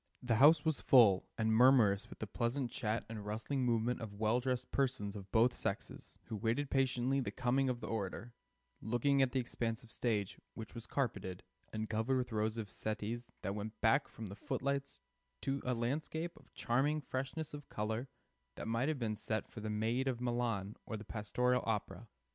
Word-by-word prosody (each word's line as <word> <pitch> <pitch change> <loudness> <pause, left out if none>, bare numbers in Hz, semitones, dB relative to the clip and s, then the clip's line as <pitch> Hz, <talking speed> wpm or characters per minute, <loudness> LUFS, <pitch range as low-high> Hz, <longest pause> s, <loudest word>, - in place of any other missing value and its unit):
The 120 -3 +2
house 150 +5 +7
was 160 -2 +1
full, 110 -8 +6
and 110 0 +2
murmurous 115 -5 +5
with - - -10
the - - -3
pleasant 120 +4 -1
chat 110 -1 -1
and 110 -2 -6
rustling 110 +6 -2
movement 120 0 +1
of 105 -3 -6
well 110 +3 +3
dressed 125 -1 -2
persons 125 -7 0
of 100 -1 -8
both 120 +2 +5
sexes - - -4
who 110 - -6
waited 120 +6 0
patiently 135 0 +2
the 130 - -1
coming 130 +1 +1
of 125 -1 -2
the - - -4
orator, 110 +2 -3 0.5
looking 130 +5 +2
at 130 -2 +3
the 130 - +1
expanse 115 -2 -2
of 115 - -15
stage, 105 -6 -1 0.2
which 110 -2 -7
was 115 - -8
carpeted, 100 -9 -2 0.3
and 110 0 -3
covered 110 +5 +1
with 125 -1 -2
rows 110 +1 0
of 105 -4 -4
settees 110 +3 -3
that 100 - -1
went 105 +1 -5
backward 110 +6 +3
from 110 - -7
the 100 -1 -7
footlights 140 +2 -2 0.4
to 135 0 -1
a 125 0 0
landscape 155 +8 -2
of - - -19
charming 140 +6 +1
freshness 135 +4 -4
of 145 -1 -8
color, 110 +4 -2 0.5
that - - -6
might 115 +4 +1
have 155 - 0
been 110 -4 -1
set 110 +1 -2
for - - -9
the 110 0 -4
"Maid 115 +5 0
of 125 -3 0
Milan" 120 -5 -1
or 110 - -4
the 105 - -9
pastoral 125 +4 +1
opera. 110 +1 -2
120 Hz, 190 wpm, -36 LUFS, 110-130 Hz, 0.5 s, house